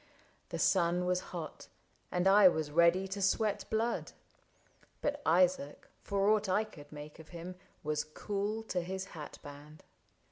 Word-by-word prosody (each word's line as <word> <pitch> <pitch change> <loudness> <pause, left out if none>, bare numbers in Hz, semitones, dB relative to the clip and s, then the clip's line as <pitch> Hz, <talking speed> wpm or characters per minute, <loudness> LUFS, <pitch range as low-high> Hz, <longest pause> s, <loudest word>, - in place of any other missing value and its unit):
The - - -4
sun 175 +1 +2
Was 180 0 +2
hot, 170 -3 -7 0.4
and 180 +1 +1
I 195 0 +8
was 155 -4 +1
ready 170 +4 +4
to 200 +1 -4
sweat 205 +2 +1
blood; 225 +2 -1 0.9
But 290 0 -2
Isaac, 175 -3 +2
for 200 0 0
aught 215 -2 +2
I 205 +4 +3
could 145 -9 -13
make 150 +1 -9
of 160 - -13
him, 175 +1 -7 0.3
Was 150 0 0
cool 205 +7 -3
to 185 -5 -2
his 190 +2 -4
hat 155 -3 -8
band. 145 +2 -12
180 Hz, 150 wpm, -33 LUFS, 155-200 Hz, 0.9 s, I